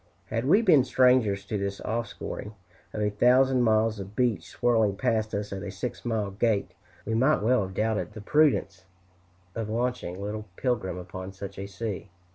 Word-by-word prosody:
Had 115 +2 -1
we 195 - +5
been 160 - +6
strangers 125 -6 +3
to 105 +1 -2
this 100 0 -3
offscouring 110 -2 -4 0.4
of 105 - -2
a 105 - +1
thousand 125 +4 +4
miles 110 -1 +2
of 100 +1 -8
beach, 120 -2 0
swirling 110 -5 +2
past 110 -2 0
us 100 0 -3
at 95 - -5
a 100 - -5
six 100 +6 -5
mile 110 -4 -1
gait, 100 +1 0 0.3
we 110 - -2
might 130 +2 +3
well 125 +2 +3
have 95 -1 -5
doubted 110 0 -1
the 110 - -8
prudence 100 - +2 0.7
of 110 0 -4
launching 115 -5 -2
little 105 +2 -4
Pilgrim 110 -8 -1
upon 95 +1 -7
such 100 0 -8
a 100 - -5
sea. 100 0 -5
110 Hz, 175 wpm, -27 LUFS, 100-125 Hz, 0.7 s, been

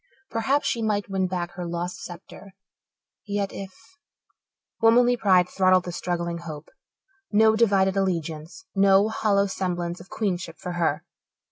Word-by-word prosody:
Perhaps 265 +6 +1
she 235 - -1
might 205 -2 -1
win 190 -1 0
back 175 -1 -3
her 175 0 -6
lost 175 +1 -4
sceptre, 185 +2 -11 0.7
yet 200 -1 -2
if 195 -1 -7 1.1
Womanly 240 +2 +5
pride 185 -6 +4
throttled 185 -1 +3
the 175 - -4
struggling 170 -1 -3
hope. 160 -3 -9 0.6
No 220 +1 +5
divided 195 -4 +3
allegiance, 170 - -3
no 195 +1 +4
hollow 200 -2 +2
semblance 175 -3 -3
of 175 - -14
queenship 190 -4 -3
for 180 -2 -6
her! 175 -2 -1
190 Hz, 135 wpm, -25 LUFS, 175-205 Hz, 1.1 s, Womanly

